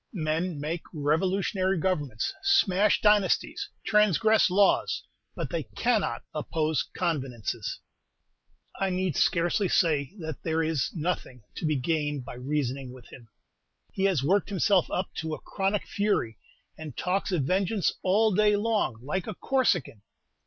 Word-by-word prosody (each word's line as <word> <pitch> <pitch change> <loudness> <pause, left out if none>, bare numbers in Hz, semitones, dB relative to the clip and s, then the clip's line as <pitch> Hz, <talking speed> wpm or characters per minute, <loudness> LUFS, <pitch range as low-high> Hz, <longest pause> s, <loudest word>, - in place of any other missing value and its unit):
Men 165 -1 -1
make 160 +3 -3
revolutionary 185 +5 +1
governments, 150 - -1
smash 210 - +3
dynasties, 210 -3 +2 0.2
transgress 210 +1 +4
laws, 195 +2 +2 0.3
but - - -4
they - - -1
cannot 215 - -1
oppose 155 0 -1 0.2
convenances! 130 - -2 1.0
I 195 - +1
need 185 -3 -1
scarcely 175 +4 +2
say 155 0 +1
that 160 -5 -6
there 165 0 0
is 155 -5 0
nothing 155 -7 -3
to 160 - -2
be 155 - +1
gained 145 -1 -1
by - - -7
reason 130 +1 -2
ing 130 -2 -8
with 125 -2 -14
him. 120 -3 -13 0.7
He 190 - 0
has 180 -9 +2
worked 195 +8 +2
himself 195 -2 +2
up 185 - -3
to 160 -1 -3
a - - -12
chronic 195 +1 -2
fury, 200 - -1 0.4
and 155 -4 -8
talks 190 +2 -1
of 170 -6 +1
vengeance 190 +4 +1
all 210 +3 +3
day 210 +1 +4
long, 205 - 0
like 175 +7 -3
a - - -4
Corsican. 185 - 0
170 Hz, 140 wpm, -27 LUFS, 145-195 Hz, 1.0 s, transgress